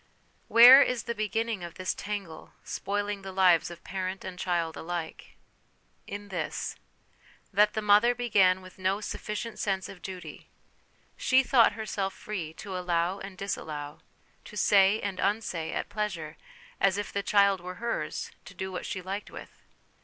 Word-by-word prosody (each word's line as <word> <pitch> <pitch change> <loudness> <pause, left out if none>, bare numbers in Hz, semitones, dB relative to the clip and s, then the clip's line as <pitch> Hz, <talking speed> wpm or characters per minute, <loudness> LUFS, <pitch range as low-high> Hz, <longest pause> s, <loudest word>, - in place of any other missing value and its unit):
Where 245 +4 +10
is 250 -4 +1
the 235 - -3
beginning 220 -1 -2
of 170 -1 -8
this 185 - -2
tangle, 200 -6 -6
spoiling 205 0 -3
the 195 0 -7
lives 185 -3 +4
of 175 -1 -11
parent 190 0 -4
and 185 -1 -7
child 170 -3 -1
alike? 170 -1 -6 0.7
In 205 0 -7
this: 175 -5 -3 0.8
that 210 +2 +4
the 220 - -1
mother 210 +4 +5
began 195 -6 +3
with 185 0 -14
no 190 +2 +1
sufficient 215 +1 -5
sense 190 -2 -1
of 180 - -11
duty; 185 -2 -9 0.7
she 260 0 +4
thought 245 -3 +5
herself 205 -3 -3
free 185 -7 -5
to 195 +2 -7
allow 180 +1 0
and 195 -1 -9
disallow, 150 -7 -5 0.5
to 210 - -10
say 200 +1 +5
and 195 -2 -4
unsay, 195 -6 -1
at - - -3
pleasure, 185 -8 -4 0.4
as 195 0 +3
if 205 - -4
the 200 - 0
child 200 -2 +3
were 180 +1 -7
hers 235 +4 -3
to - - -12
do 190 0 -4
what 180 - -5
she 185 - -4
liked 195 +3 -5
with. - - -12
195 Hz, 160 wpm, -28 LUFS, 180-210 Hz, 0.8 s, Where